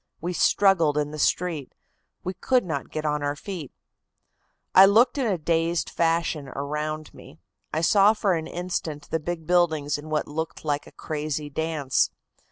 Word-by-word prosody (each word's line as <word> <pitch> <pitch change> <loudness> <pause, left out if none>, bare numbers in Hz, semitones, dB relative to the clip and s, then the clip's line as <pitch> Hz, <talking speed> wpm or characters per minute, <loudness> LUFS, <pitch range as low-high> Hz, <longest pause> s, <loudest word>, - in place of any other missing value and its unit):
We 175 +2 -3
struggled 170 -5 +3
in 150 0 0
the 155 - -7
street. 160 -4 0 0.5
We 185 - -3
could 245 +6 +1
not 155 -5 -4
get 155 0 -4
on 150 -1 0
our 145 0 -1
feet. 165 -3 -7 1.0
"I 190 +1 +9
looked 240 +7 +4
in 255 - +1
a 195 -4 +1
dazed 165 +1 0
fashion 165 -3 0
around 150 +3 -4
me. 75 - -14 0.3
I 160 - -1
saw 200 +4 +5
for 205 -3 +1
an 160 -2 -2
instant 170 -4 -4
the 160 - +1
big 165 0 -5
buildings 160 -4 +2
in 155 +1 -10
what 155 -1 -1
looked 160 +1 -5
like 145 -1 -1
a - - -13
crazy 150 -1 -4
dance. 155 -3 0
160 Hz, 170 wpm, -25 LUFS, 150-175 Hz, 1.0 s, I